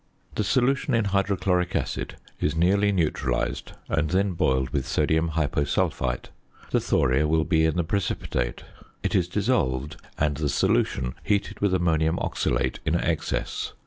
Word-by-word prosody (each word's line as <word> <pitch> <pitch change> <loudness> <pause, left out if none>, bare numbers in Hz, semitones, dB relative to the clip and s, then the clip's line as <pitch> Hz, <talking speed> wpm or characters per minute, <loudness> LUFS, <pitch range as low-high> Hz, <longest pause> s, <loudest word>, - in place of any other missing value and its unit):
The 105 - -1
solution 130 +3 +2
in 115 -2 +2
hydrochloric 95 -3 +1
acid - - -2 0.2
is 75 - 0
nearly 100 +5 +3
neutralised 75 -9 -1
and 80 -2 0
then 95 +2 +2
boiled 65 -7 +1
with 70 -1 -1
sodium 80 +3 +1
hyposulphite. 70 -5 0 0.4
The - - +3
thoria 65 +4 +2
will 80 +1 +2
be 80 -2 +2
in 80 - -1
the 85 - +1
precipitate. 80 -9 -2 0.4
It - - -1
is 90 -2 +2
dissolved, 80 - 0 0.2
and 75 -1 +1
the 75 -1 -1
solution 65 -1 +1
heated 100 -1 -1
with 100 -2 +2
ammonium 80 -2 +1
oxalate - - -1
in 80 +1 +1
excess. 85 -2 -2
80 Hz, 145 wpm, -25 LUFS, 75-95 Hz, 0.4 s, nearly